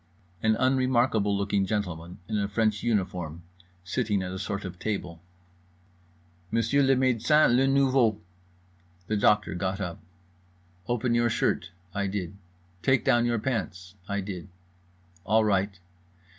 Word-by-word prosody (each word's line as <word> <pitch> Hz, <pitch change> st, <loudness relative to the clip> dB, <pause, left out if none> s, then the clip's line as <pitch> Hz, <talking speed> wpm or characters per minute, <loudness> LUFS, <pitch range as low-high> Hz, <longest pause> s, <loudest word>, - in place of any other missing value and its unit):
An 110 Hz, 0 st, +3 dB
unremarkable 130 Hz, -5 st, +2 dB
looking 100 Hz, -1 st, 0 dB
gentleman 90 Hz, -5 st, -3 dB
in 110 Hz, -1 st, -1 dB
a 100 Hz, -, 0 dB
French 105 Hz, 0 st, 0 dB
uniform, 90 Hz, -7 st, -2 dB, 0.4 s
sitting 105 Hz, 0 st, -1 dB
at 90 Hz, -, -4 dB
a 95 Hz, -, -5 dB
sort 100 Hz, +1 st, -4 dB
of 90 Hz, -1 st, -8 dB
table. 90 Hz, -6 st, -4 dB, 1.3 s
"Monsieur 115 Hz, +7 st, +2 dB
le 135 Hz, -1 st, +4 dB
médecin, 130 Hz, +1 st, +3 dB
le 135 Hz, +2 st, +3 dB
nouveau." 135 Hz, -6 st, +3 dB, 0.9 s
The 110 Hz, -, -1 dB
doctor 105 Hz, 0 st, +3 dB
got 95 Hz, +2 st, -2 dB
up. 90 Hz, -4 st, -4 dB, 0.9 s
"Open 120 Hz, 0 st, 0 dB
your 120 Hz, 0 st, +3 dB
shirt." 115 Hz, -5 st, 0 dB, 0.2 s
I 100 Hz, 0 st, -1 dB
did. 95 Hz, -3 st, -4 dB, 0.5 s
"Take 130 Hz, +4 st, +2 dB
down 120 Hz, 0 st, +3 dB
your 120 Hz, 0 st, +1 dB
pants." 95 Hz, -7 st, -3 dB, 0.2 s
I 100 Hz, 0 st, -1 dB
did. 95 Hz, -2 st, -6 dB, 0.8 s
"All 110 Hz, +3 st, +3 dB
right." 100 Hz, -2 st, 0 dB
105 Hz, 130 wpm, -27 LUFS, 95-120 Hz, 1.3 s, le